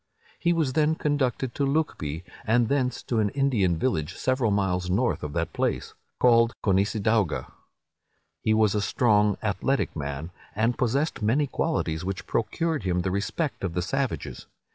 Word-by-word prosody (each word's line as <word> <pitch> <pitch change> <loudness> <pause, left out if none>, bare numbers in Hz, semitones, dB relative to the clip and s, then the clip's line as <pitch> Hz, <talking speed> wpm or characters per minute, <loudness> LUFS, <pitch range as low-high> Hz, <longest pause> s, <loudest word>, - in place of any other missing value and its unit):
He 170 - +2
was 160 -6 +1
then 155 +2 +2
conducted 135 -5 0
to 140 - -1
Lucbee, 135 - -1 0.2
and 115 0 +2
thence 130 -3 0
to 115 - -1
an 105 -1 +2
Indian 110 -10 +1
village, 80 -7 -1
several 130 -3 +1
miles 95 -3 0
north 120 +7 +1
of 75 -1 -5
that 85 -1 -2
place, - - -1 0.3
called 115 -1 +5
Conissadawga. 100 - +1 0.9
He 110 - +2
was 110 -2 +3
a 105 - +1
strong, 105 -2 +3
athletic 110 +6 0
man, 70 +2 -4 0.2
and 115 +3 +1
possessed 135 +5 0
many 120 +8 +2
qualities 80 - -1
which 95 +1 -4
procured 160 +7 -1
him 90 -2 0
the 95 +1 -1
respect 105 - -2
of 90 -3 -2
the 90 - 0
savages. 135 +6 -3
110 Hz, 155 wpm, -26 LUFS, 95-130 Hz, 0.9 s, called